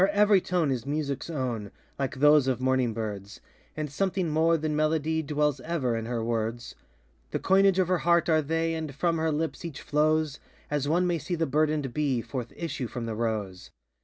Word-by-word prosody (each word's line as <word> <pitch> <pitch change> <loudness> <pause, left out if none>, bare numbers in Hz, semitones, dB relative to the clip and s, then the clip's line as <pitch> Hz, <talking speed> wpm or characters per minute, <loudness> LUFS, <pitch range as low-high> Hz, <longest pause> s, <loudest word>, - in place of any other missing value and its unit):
Her 190 - +6
every 205 -1 +4
tone 175 -6 0
is 125 -3 -2
musicŌĆÖs 140 0 -3
own, 120 -7 -2 0.3
Like 135 -1 -2
those 145 0 +5
of 130 -2 0
morning 130 -2 +1
birds, 105 -2 -5 0.4
And 150 -2 -3
something 185 +2 0
more 165 +2 +3
than 155 -1 -2
melody 155 +1 +1
Dwells 150 -2 0
ever 130 -5 -1
in 115 0 -3
her 120 -2 -2
words; 115 +1 -2 0.6
The - - -2
coinage 195 0 +4
of 185 -2 +3
her 185 -1 +1
heart 170 0 +3
are 160 -2 +4
they, 165 +2 -1
And 160 -4 -4
from 165 +2 0
her 160 0 +1
lips 160 +3 -2
each 165 -5 -6
flows 155 0 +1 0.3
As 145 -1 0
one 175 +4 +2
may 175 -2 0
see 175 - -3
the 165 -1 0
burdenŌĆÖd 150 -2 0
bee 140 -5 0
Forth 120 0 -5
issue 160 -7 -4
from 120 0 -5
the 115 - -3
rose. 105 -5 -3
150 Hz, 195 wpm, -27 LUFS, 125-165 Hz, 0.6 s, Her